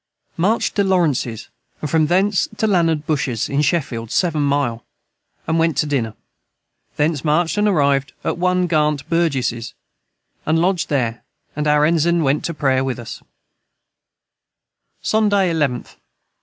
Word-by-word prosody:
Marched 200 +7 +1
to 200 - +4
Lawrences 150 - 0 0.3
and 150 - -3
from 155 +1 +2
thence 190 +4 +2
to - - 0
Landard 165 -7 +1
Bushes 135 -7 -1
in 140 +1 0
Shefield 140 -7 -1
7 165 -1 +1
mile 140 -5 0 0.6
and 160 +1 0
went 165 -4 +1
to 150 - +2
diner 120 -7 -2 0.8
thence 150 -2 0
marched 160 +2 +1
and 210 0 +2
arived 140 -7 +1
at - - -2
one 180 0 +2
Garnt 150 -3 0
Burges 130 -9 -1 0.7
and 160 +1 +1
lodged 180 +1 +1
their 120 -5 -1 0.3
and 150 0 -1
our 150 0 +4
Ensign 170 +1 +2
went 140 +1 +1
to 170 - -2
Prayer 135 -3 +1
with 130 -1 -2
us 120 -3 -8 1.8
Sonday 205 -4 +2
11th. 140 -7 -2
150 Hz, 140 wpm, -19 LUFS, 135-170 Hz, 1.8 s, to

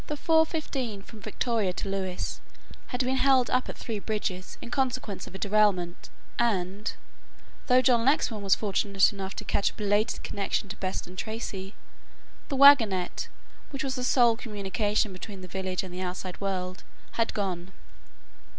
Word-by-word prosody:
15 300 - 0
from 220 0 -13
Victoria 215 -1 0
to 195 - -4
Lewes 190 -2 -3 0.5
had 250 0 -1
been 260 +1 +1
held 265 -2 +4
up 255 0 +1
at - - -6
Three 220 -3 -4
Bridges 200 -3 -3
in 235 - -9
consequence 255 -7 -1
of - - -11
a - - -3
derailment 200 -4 +1 0.3
and, 205 -3 0 0.8
though 255 0 +5
John 240 -2 +4
Lexman 235 -5 +2
was 195 -1 +4
fortunate 200 -1 +2
enough 195 -1 -5
to - - -5
catch 200 - +2
a - - -13
belated 210 +2 0
connection 200 0 -2
to 210 - -5
Beston 185 -1 -4
Tracey, 200 -2 -5 0.7
the 275 - -1
wagonette 230 -10 +6 0.4
which 275 -2 -4
was 270 -1 -1
the 250 - -3
sole 240 -2 +5
communication 210 -2 -1
between 190 +1 -8
the 185 - -8
village 190 0 -2
and 185 -1 -8
the 180 - -4
outside 185 0 -5
world 185 -2 -3 0.3
had 230 -1 0
gone. 185 -3 -2
205 Hz, 155 wpm, -28 LUFS, 190-245 Hz, 0.8 s, wagonette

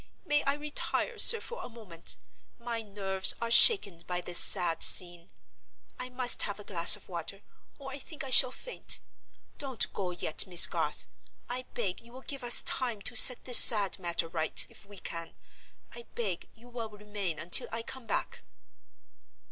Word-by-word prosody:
May 295 -3 -2
I 275 - -2
retire, 295 0 -5
sir, 460 - +6
for 480 0 -11
a - - -12
moment? 210 -8 -5 0.4
My 235 -1 -8
nerves 195 -2 +1
are 230 0 -7
shaken 235 - +5
by 180 -1 -6
this 175 0 0
sad 165 -2 +3
scene. 175 -1 +3 0.7
I 250 - -9
must 250 -1 0
have 205 0 -6
a - - -11
glass 175 -1 +2
of 210 - -16
water, 185 +3 -10 0.3
or 270 -2 -13
I 275 - -11
think 310 +2 -11
I 270 - -10
shall 255 - +6
faint. - - -4 0.6
Don't 265 -5 -3
go 190 -2 -7
yet, 175 -2 -2
Miss 175 -2 +6
Garth. - - -6 0.4
I 250 +1 -8
beg 195 -7 -6
you 235 +1 -20
will 260 - -14
give 275 -2 -9
us 240 0 +3
time 235 -6 -3
to 240 - -3
set 250 +2 +6
this 250 -2 +7
sad 205 -5 +5
matter 170 -2 -5
right, 160 -2 -2
if 200 - -18
we 205 0 -16
can—I 170 +7 -15
beg 195 -7 -7
you 235 +2 -22
will 235 -2 -10
remain 205 -5 -9
until 170 +3 +1
I 230 0 -7
come 255 0 -13
back." - - -7
215 Hz, 175 wpm, -26 LUFS, 180-250 Hz, 0.7 s, this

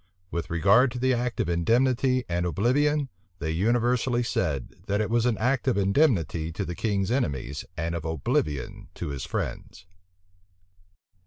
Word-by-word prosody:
With 85 - -3
regard 100 +10 +4
to - - -5
the 130 +1 +2
act 120 0 -2
of - - +1
indemnity 125 +8 +2
and 85 0 -1
oblivion, 135 - +1 0.3
they 80 -2 -3
universally 120 +6 +1
said, 75 - -2
that 100 +1 0
it 110 0 -1
was 120 +1 +2
an 115 -4 +1
act 135 +6 0
of 125 - +2
indemnity 95 - +2
to - - -3
the 85 - -4
king's 100 +1 -1
enemies 70 - -2
and 85 0 -2
of 85 -2 -3
oblivion 75 -3 -2
to - - -4
his 70 -3 -4
friends. 90 - -5
105 Hz, 155 wpm, -26 LUFS, 85-125 Hz, 0.3 s, regard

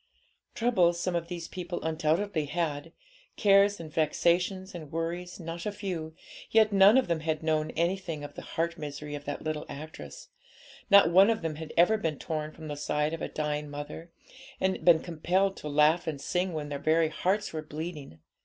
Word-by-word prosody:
Troubles 180 -8 +2
some 180 0 -1
of 170 -1 -2
these 170 -1 -6
people 175 -1 -5
undoubtedly 160 +2 0
had, 145 -2 -3 0.5
cares 200 0 +5
and 155 -2 -9
vexations 175 +4 +1
and 155 -4 -8
worries 170 +3 -4
not 170 0 -6
a - - -1
few, 180 -6 -5 0.3
yet 220 -1 +4
none 200 +4 +7
of 265 - +2
them 170 -2 0
had 155 0 -2
known 155 -1 +1
anything 170 -3 -1
of 145 - -8
the - - -8
heart 170 +1 -3
misery 150 0 -6
of 145 0 -6
that 145 - -5
little 155 -1 -2
actress; 155 +3 -9 0.6
not 200 -4 +7
one 190 +4 +7
of 220 -5 0
them 155 -2 -3
had 160 -1 -7
ever 180 +6 +5
been 160 -7 -2
torn 155 0 -4
from 160 0 -10
the 145 - -4
side 150 +1 -1
of 165 - -5
a - - -2
dying 150 -1 -3
mother, 145 +3 -7 0.5
and 190 0 0
been 165 -2 +6
compelled 180 +4 0
to 150 - -6
laugh 150 +4 +3
and 150 -3 -3
sing 180 +6 -1
when 150 -2 -4
their 140 -1 -4
very 160 +2 +2
hearts 195 +6 -1
were 155 - -3
bleeding. 155 - -7
165 Hz, 190 wpm, -29 LUFS, 155-180 Hz, 0.6 s, none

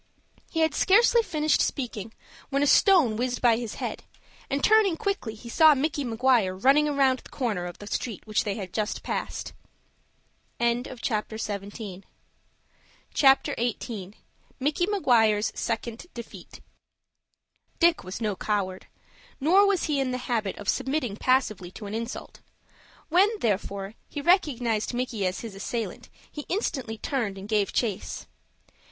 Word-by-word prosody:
He 325 - -1
had 320 -2 +3
scarcely 470 +4 +5
finished 310 -7 +1
speaking, 230 -5 -3 0.4
when 275 0 +1
a - - +4
stone 295 - +5
whizzed 250 +1 -1
by 235 -2 +4
his 235 -3 -5
head, - - -5 0.5
and, 275 +1 -1
turning 425 -6 +5
quickly, 395 - -2
he 225 +3 -12
saw 310 +5 +6
Micky 290 +1 -1
Maguire 230 -5 +2
running 275 +9 +4
round 265 -2 +3
the - - -15
corner 210 -9 -2
of 175 - -9
the 205 - -10
street 215 0 -4
which 215 -1 0
they 205 -2 -2
had 190 -5 -7
just 215 0 -2
passed. - - -4 1.1
CHAPTER 235 -2 -1
XVIII. 205 -2 -5 2.6
MICKY 295 +6 +1
MAGUIRE'S 225 - +3
SECOND 230 +5 -4
DEFEAT 235 -1 -10 1.2
Dick 340 -1 +3
was 185 +3 -6
no 215 -3 -1
coward. 190 -2 -2 0.5
Nor 370 +8 +5
was 395 -3 +1
he 295 -3 0
in 270 -1 0
the 250 - -1
habit 230 -5 -2
of 205 - -9
submitting 265 -6 0
passively 215 -7 +1
to 215 - -9
an 200 - -6
insult. 230 +2 -5 0.7
When, 365 +5 +5
therefore, 200 -2 -2 0.2
he - - -5
recognized 250 - +1
Micky 240 -6 -1
as 185 - -3
his 230 -3 -7
assailant, 220 +3 -5 0.2
he 295 - -7
instantly 265 - -2
turned 215 -4 -2
and 195 +1 -8
gave 210 -2 +1
chase. 190 - -2
240 Hz, 140 wpm, -26 LUFS, 210-290 Hz, 2.6 s, saw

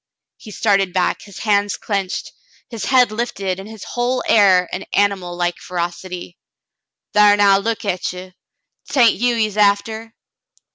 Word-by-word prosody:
He 220 - -13
started 200 -4 +1
back, 185 -1 0
his 200 -2 -13
hands 205 -2 0
clinched, 195 -3 -3 0.4
his 230 -3 -5
head 255 -3 +4
lifted, 200 -5 -3
in 195 - -9
his 220 -2 -10
whole 245 +1 -2
air 190 -4 +5
an 185 - -4
animal 195 -3 0
like 175 0 -1
ferocity. 175 0 -6 0.7
"Thar 210 0 +5
now, 200 -1 +5
look 225 +2 -3
at 185 -2 -2
ye. 185 0 -10 0.6
'Tain't 250 -5 +4
you 245 0 +2
he's 215 -2 -1
after." 220 +2 +1
200 Hz, 145 wpm, -19 LUFS, 185-220 Hz, 0.7 s, air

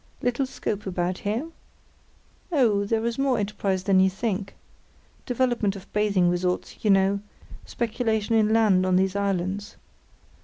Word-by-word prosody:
Little 250 +2 0
scope 210 -6 -4
about 180 0 -2
here? 220 +9 -2 1.0
Oh, 225 -10 +3
there 225 +2 0
is 235 +2 -2
more 270 -2 +2
enterprise 200 -2 -1
than 190 -1 +3
you 190 0 +5
think—development 215 +3 -3
of 195 - -12
bathing 205 -4 +2
resorts, 180 +1 -2
you 215 - +2
know, 195 0 +4 0.5
speculation 225 -1 -1
in 215 -1 +3
land 215 -5 +4
on 185 -1 +2
these 190 +1 +2
islands. 200 0 -2
205 Hz, 130 wpm, -25 LUFS, 190-225 Hz, 1.0 s, you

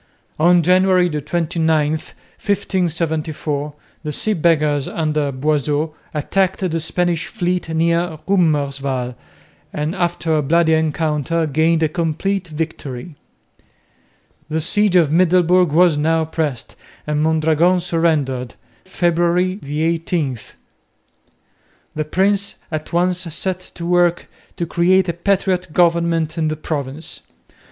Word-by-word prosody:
On 175 +2 +5
January 185 0 +3
29, 155 0 0
1574, 160 -4 -3 0.3
the 155 -2 -4
Sea 215 +8 +1
Beggars 150 -5 +1
under 155 -3 -1
Boisot 150 +2 -1 0.2
attacked 190 +6 0
the 170 -3 -1
Spanish 170 +1 0
fleet 180 -1 -2
near 170 +1 0
Roemerswaal 140 -8 0 0.6
and 150 +3 -2
after 170 -3 -1
a 150 - +2
bloody 160 +3 +3
encounter 160 0 0
gained 160 +2 +2
a - - +4
complete 170 +5 -2
victory. 155 -2 -5 1.4
The 160 +1 -1
siege 195 +4 +1
of 165 -5 +4
Middelburg 180 0 +3
was 165 -1 +4
now 160 +1 +1
pressed 155 -6 -3 0.3
and 150 0 -1
Mondragon 160 +3 +2
surrendered, 155 -8 -1 0.3
February 175 +1 +1
18. 155 -2 -1 1.5
The 155 0 -2
prince 200 +5 0 0.2
at 155 -1 -4
once 180 +1 +1
set 185 +2 -3 0.2
to 170 - -6
work 175 0 +2 0.3
to 170 - -2
create 185 +3 +2
a - - 0
patriot 185 -1 0
government 170 -2 +1
in 160 - +1
the 155 0 -2
province. 145 0 -5
165 Hz, 110 wpm, -19 LUFS, 150-175 Hz, 1.5 s, On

